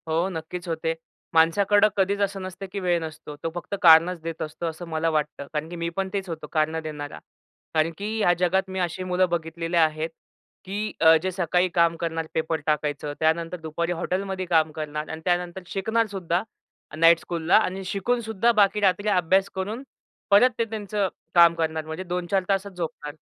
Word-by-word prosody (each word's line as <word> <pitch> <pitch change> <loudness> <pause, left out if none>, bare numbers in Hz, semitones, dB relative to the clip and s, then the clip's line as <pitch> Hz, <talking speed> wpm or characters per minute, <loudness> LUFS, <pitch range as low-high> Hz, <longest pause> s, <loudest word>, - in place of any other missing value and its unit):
हो, 165 +3 +1
नक्कीच 175 +1 -6
होते. 160 0 -1 0.4
माणसाकडं 200 +6 +4
कधीच 200 +1 +1
असं 200 -1 -1
नसतं, 185 +1 -7
की 200 - -3
वेळ 175 -2 +1
नसतो. 155 -1 -8
तो 165 - -1
फक्त 175 +3 -4
कारणच 165 +1 +6
देत 165 0 -6
असतो, 160 +2 -5
असं 165 +1 -5
मला 160 0 0
वाटतं. 150 -2 -2
कारण 150 +1 -3
की 175 - -7
मी 170 0 -2
पण 195 0 -1
तेच 195 -2 -3
होतो 160 -1 -6
कारणं 160 0 +1
देणारा. 150 -2 -6 0.5
कारण 160 +1 +2
की 215 +2 -3
ह्या 175 -4 +4
जगात 190 +2 +1
मी 190 0 -4
अशी 175 0 -2
मुलं 185 0 +1
बघितलेली 165 0 -2
आहेत, 160 0 +2 0.6
की 205 +3 -3
अ, 160 0 +8
जे 185 - 0
सकाळी 180 0 +1
काम 170 -1 +4
करणार, 165 -1 -3
पेपर 160 0 -1
टाकायचं. 150 -1 -1
त्यानंतर 165 +2 +1
दुपारी 160 +2 -3
हॉटेलमध्ये 190 0 -2
काम 160 -3 +2
करणार 150 0 -5
आणि 160 0 -6
त्यानंतर 180 0 -1
शिकणारसुद्धा 195 -4 -1 0.5
नाईट 165 +1 +6
स्कूलला 170 -1 +2
आणि 195 -3 0
शिकूनसुद्धा 220 +3 0
बाकी 210 -2 +3
रात्री 200 +1 +2
अभ्यास 190 0 +3
करून 210 +7 -4 0.5
परत 205 +5 +7
ते 230 - +2
त्यांचं 210 -2 -2 0.3
काम 170 -1 +8
करणार 160 -1 -2
म्हणजे 160 +4 -5
2-4 180 +1 -1
तासच 195 0 0
झोपणार. 160 -4 -5
175 Hz, 175 wpm, -25 LUFS, 160-195 Hz, 0.6 s, अ